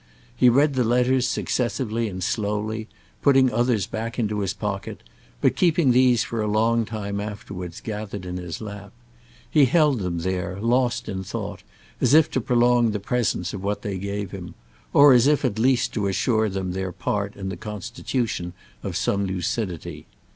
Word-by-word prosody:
He 125 - +5
read 140 +4 +4
the 130 -1 +2
letters 125 +2 +2
successively 115 -2 -1
and 95 -1 -5
slowly, 105 +2 -2 0.3
putting 135 -3 +5
others 120 -5 +2
back 115 +2 -5
into 105 -3 -1
his 100 -2 -1
pocket - - -5 0.4
but - - +3
keeping 165 -6 +3
these 125 -2 +4
for 115 -1 -3
a 105 - -1
long 115 +2 +2
time 100 -2 -4
afterwards 100 -4 -7
gathered 105 -3 -5
in 90 0 -4
his 90 0 -6
lap. 100 -2 -8 0.5
He 145 -3 +5
held 150 -2 +3
them 90 -3 -2
there, 90 +2 -3
lost 120 +1 +1
in 95 -2 -4
thought, - - -5 0.4
as 145 - +4
if 160 -1 +5
to 130 - 0
prolong 120 0 +3
the 105 -1 -2
presence 105 -4 -1
of 100 -2 -6
what 105 +1 -2
they 100 -2 -3
gave 100 0 -4
him; 90 -3 -8 0.4
or 145 -1 +8
as 125 +1 +5
if 145 -1 +3
at 115 -5 0
the - - 0
least 130 0 +2
to 105 -3 0
assure 110 +2 +1
them 95 -1 -3
their 95 0 -3
part 100 +3 -2
in 95 -1 -5
the 95 - -4
constitution 105 -2 -4 0.3
of - - -3
some 100 0 0
lucidity. 95 -1 -3
110 Hz, 175 wpm, -24 LUFS, 100-125 Hz, 0.5 s, or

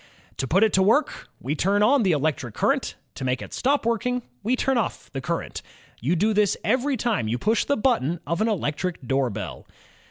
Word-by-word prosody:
To 135 - -2
put 190 +9 +4
it 220 - +3
to 190 - +4
work, 225 +11 +2
we 135 +5 -2
turn 200 +6 +2
on 275 +5 +5
the 190 -5 +3
electric 145 -6 -1
current; - - 0 0.2
to 135 - -7
make 130 0 0
it - - -9
stop 275 -1 +1
working, 245 +2 0 0.2
we 245 +4 +1
turn 270 +1 +1
off 225 - -4
the 135 - -4
current. 170 +4 -3 0.4
You 150 +10 +1
do 210 +6 +2
this 210 -2 +2
every 265 +1 +1
time 215 - 0
you 115 +3 0
push 220 - +1
the 285 - +1
button 190 - +1
of 170 +3 -1
an 220 - +3
electric 175 - -2
doorbell. 130 -6 -2
195 Hz, 200 wpm, -24 LUFS, 145-230 Hz, 0.4 s, on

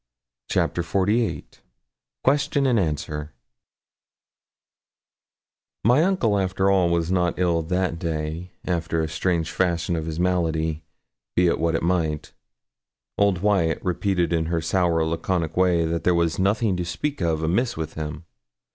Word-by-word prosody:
CHAPTER 85 - +1
XLVIII 100 +7 0 0.8
QUESTION 140 +1 +2
AND 125 -4 +3
ANSWER 75 -3 -3 2.5
My 125 +9 +5
uncle, 130 - +2
after 95 +1 +1
all, 95 -3 +3
was 85 0 0
not 90 -2 +1
ill 85 -2 +2
that 90 +1 -1
day, 80 +1 -3 0.2
after 80 -2 -1
the - - -1
strange 80 0 -1
fashion 85 -2 0
of 80 -1 -3
his 80 0 -4
malady, 80 -3 0 0.5
be 90 - +4
it 85 - +2
what 85 0 +1
it - - -1
might. 80 -4 -1 0.9
Old 100 -3 +2
Wyat 95 -6 +2
repeated 90 -1 0
in 80 -1 0
her 85 0 0
sour 85 0 +1
laconic 80 0 -1
way 90 -2 +3
that 85 +1 -2
there 90 - +3
was 85 0 +1
'nothing 100 +1 +2
to 90 - -2
speak 140 +10 -3
of 80 -2 0
amiss 105 +9 0
with 80 -1 -4
him.' 80 +1 -6
85 Hz, 140 wpm, -24 LUFS, 80-95 Hz, 2.5 s, My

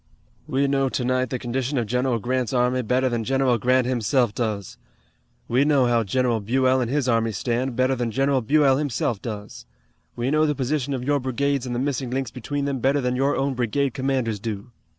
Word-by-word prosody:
We 140 -2 +1
know 135 -1 +1
tonight 130 0 0
the 130 - -2
condition 130 +3 -2
of 120 - 0
General 125 +2 0
Grant's 125 +2 -1
army 125 0 +2
better 125 +3 +1
than 120 -2 -1
General 130 -1 +1
Grant 125 +2 +2
himself 120 -1 +1
does. 105 -6 -3 0.7
We 125 +4 +3
know 145 -3 +3
how 120 -1 +2
General 120 +2 0
Buell 130 +4 +2
and 120 - -1
his 140 -1 0
army 115 -2 +2
stand 120 +4 -1
better 130 +2 +2
than 120 -2 -2
General 135 +3 +1
Buell 135 +2 +3
himself 125 -7 -1
does. 105 -3 -7 0.5
We 120 +3 -1
know 155 +1 +3
the 150 - 0
position 140 0 -1
of 125 - -4
your 145 +2 +1
brigades 135 +1 -1
and 120 - -3
the - - -1
missing 135 -1 -2
links 130 -1 -2
between 140 +3 -3
them 140 -2 -2
better 135 +4 +2
than 125 -1 -1
your 135 +2 +1
own 135 0 0
brigade 125 +2 0
commanders 130 -5 -1
do." 110 +2 -5
130 Hz, 200 wpm, -23 LUFS, 120-135 Hz, 0.7 s, We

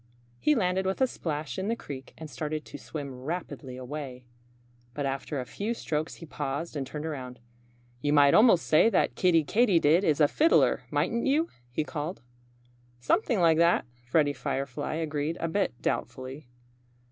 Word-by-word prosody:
He 300 - +3
landed 190 -3 +1
with 190 - -1
a 260 - +5
splash 150 - -4
in 190 - -2
the 230 - +1
creek 135 - -9
and 160 - -7
started 155 0 -4
to - - -9
swim 145 -4 -6
rapidly 145 -4 -5
away. 130 -1 -7 0.7
But 145 - -2
after 135 +1 -3
a 125 - -4
few 215 - -3
strokes 155 -6 -3
he 165 - -10
paused 145 +2 -4
and 135 -3 -3
turned 150 +2 -6
around. 130 -5 -6 0.6
"You 145 - +1
might 145 -1 +6
almost 215 -6 +6
say 155 +8 +5
that - - +2
Kiddie 170 -3 +3
Katydid 180 - +4
is 155 -5 +2
a 150 - +6
fiddler, 320 - +3
mightn't 235 +2 0
you?" 310 +5 +2 0.2
he 125 +5 -1
called. 155 +1 -5 0.8
"Something 215 - +1
like 165 -1 +5
that!" 170 +1 +4 0.2
Freddie 145 +3 +3
Firefly 140 +2 -3
agreed 155 0 -2
a 165 - -1
bit 170 - -1
doubtfully. 130 +2 -3
155 Hz, 165 wpm, -28 LUFS, 140-180 Hz, 0.8 s, might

